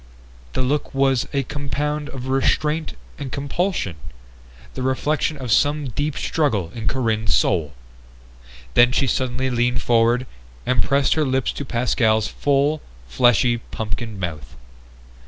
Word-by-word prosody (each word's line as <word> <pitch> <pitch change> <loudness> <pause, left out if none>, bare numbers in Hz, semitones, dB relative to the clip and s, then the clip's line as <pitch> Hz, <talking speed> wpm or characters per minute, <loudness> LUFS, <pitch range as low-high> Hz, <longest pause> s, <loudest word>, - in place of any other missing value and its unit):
The 130 - 0
look 140 +2 -1
was 135 -2 +2
a 140 -1 0
compound 145 +2 -3
of 130 -1 -7
restraint 150 +4 +1 0.3
and 140 -3 -5
compulsion, 140 - -2 0.8
the - - -5
reflection 145 +4 0
of 130 -4 -5
some 145 +3 +2
deep 145 +5 -2
struggle 110 - 0
in 115 -1 -4
Corinne's 110 - +1
soul. 75 0 +1 1.0
Then 120 +1 +6
she 135 - +2
suddenly 130 +1 -1
leaned 120 0 +1
forward 120 +1 +3 0.4
and 125 -1 +2
pressed 140 0 +2
her 155 - +1
lips 130 -2 0
to 140 - -6
Pascal's 115 -3 +1
full, 145 +2 +1 0.3
fleshy 120 - +3
pumpkin 110 -1 -5
mouth. 75 -8 -5
130 Hz, 130 wpm, -22 LUFS, 115-145 Hz, 1.0 s, Then